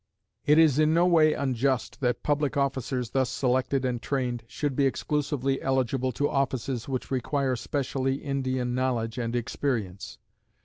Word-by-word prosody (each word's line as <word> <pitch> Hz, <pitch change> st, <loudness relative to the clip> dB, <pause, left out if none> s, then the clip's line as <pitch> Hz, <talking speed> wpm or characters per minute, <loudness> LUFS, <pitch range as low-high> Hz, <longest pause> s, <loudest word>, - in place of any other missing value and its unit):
It 150 Hz, +1 st, +6 dB
is 155 Hz, -3 st, +5 dB
in 155 Hz, +1 st, +4 dB
no 170 Hz, +1 st, +4 dB
way 160 Hz, -3 st, +5 dB
unjust 130 Hz, -1 st, -1 dB
that 125 Hz, -2 st, 0 dB
public 145 Hz, -1 st, 0 dB
officers 130 Hz, -3 st, -1 dB
thus 130 Hz, -2 st, +1 dB
selected 130 Hz, +1 st, 0 dB
and 120 Hz, -2 st, -1 dB
trained 125 Hz, -4 st, -2 dB
should 140 Hz, +2 st, -3 dB
be 140 Hz, 0 st, +3 dB
exclusively 140 Hz, -1 st, -1 dB
eligible 130 Hz, -1 st, 0 dB
to 145 Hz, +5 st, +1 dB
offices 130 Hz, -3 st, -1 dB
which 130 Hz, 0 st, -3 dB
require 135 Hz, +1 st, 0 dB
specially 135 Hz, +1 st, -1 dB
Indian 130 Hz, -3 st, -2 dB
knowledge 125 Hz, -2 st, -1 dB
and 115 Hz, 0 st, -2 dB
experience. 115 Hz, -5 st, -3 dB
130 Hz, 145 wpm, -27 LUFS, 125-140 Hz, -, It